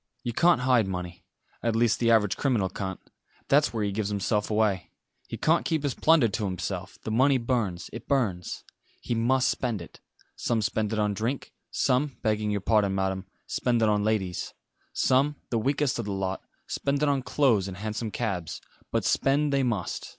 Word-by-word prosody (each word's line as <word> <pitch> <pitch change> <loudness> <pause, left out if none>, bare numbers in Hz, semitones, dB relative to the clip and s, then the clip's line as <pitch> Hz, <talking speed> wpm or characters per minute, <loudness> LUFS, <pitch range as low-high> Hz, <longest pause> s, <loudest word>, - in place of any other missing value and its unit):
You 120 - -3
can't 170 -1 +4
hide 125 -5 +3
money 90 -2 -5 0.4
at 115 -1 0
least 115 -1 +2
the 115 - +2
average 105 -4 +4
criminal 115 -9 +1
can't. 95 0 -5 0.5
That's 145 +2 +4
where 110 -2 -2
he 100 - 0
gives 100 0 -2
himself 105 +1 0
away. 105 -5 +1 0.4
He - - -5
can't 165 +2 +2
keep 160 -3 -1
his 140 -3 0
plunder 160 -6 +4
to 105 0 -2
himself 95 +1 -4
the 110 - -3
money 130 +4 +4
burns 115 -8 -1
it 115 - -8
burns 105 -11 -1 0.4
he - - -3
must 125 +3 +2
spend 120 -5 -1
it. 85 - -12 0.4
Some 115 -2 0
spend 105 +1 -1
it 110 - -1
on 105 -1 +1
drink; 115 +7 -3 0.2
some, 135 +1 +1
begging 110 -1 +1
your 105 -1 -1
pardon, 100 -2 +2
Madam 95 0 -1 0.2
spend 120 -2 0
it 110 - +4
on 105 -1 +2
ladies; 100 -5 -1 0.4
some, 140 +3 +2 0.2
the 115 - +1
weakest 135 +2 0
of 115 - -2
the 100 - -3
lot, 95 0 -2 0.2
spend 140 +1 -1
it - - +3
on 140 -2 +2
clothes 125 -8 +2
and 95 -2 -7
hansom 110 +2 -3
cabs; 95 -8 -3 0.3
but - - 0
spend 140 +1 +2
they 140 - +3
must. 115 -8 -2
110 Hz, 185 wpm, -27 LUFS, 100-130 Hz, 0.5 s, can't